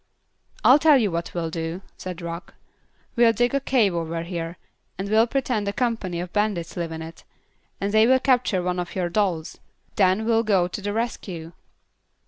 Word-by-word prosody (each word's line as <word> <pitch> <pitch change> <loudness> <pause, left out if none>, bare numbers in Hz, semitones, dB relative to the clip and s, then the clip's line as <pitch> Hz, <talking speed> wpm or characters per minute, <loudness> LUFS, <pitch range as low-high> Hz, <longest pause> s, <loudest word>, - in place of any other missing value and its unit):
"I'll 270 +4 +7
tell 305 -2 +6
you 215 -6 +1
what 170 +1 -4
we'll 165 -2 -2
do," 165 +3 -4
said 180 -2 -7
Rock. 170 +2 -7 0.6
"We'll 235 -2 +5
dig 245 +1 +1
a 275 - +2
cave 245 -8 +2
over 165 0 -3
here, 170 0 -5 0.4
and 195 +2 -3
we'll 220 +3 +4
pretend 245 -5 -1
a 200 - -1
company 225 -8 -1
of 175 0 -6
bandits 205 -5 -1
live 170 -2 -3
in 160 0 -5
it, 165 +1 -11 0.6
and 200 +1 -2
they 220 +1 +6
will 260 +1 +6
capture 250 -8 +2
one 180 0 -1
of 175 - -5
your 180 -2 -1
dolls. 175 -4 -1 0.4
Then 195 +2 +3
we 230 - +1
will 225 0 +4
go 195 -6 +2
to 180 - -6
the 205 +1 -2
rescue." 190 -7 -4
195 Hz, 190 wpm, -24 LUFS, 170-230 Hz, 0.6 s, I'll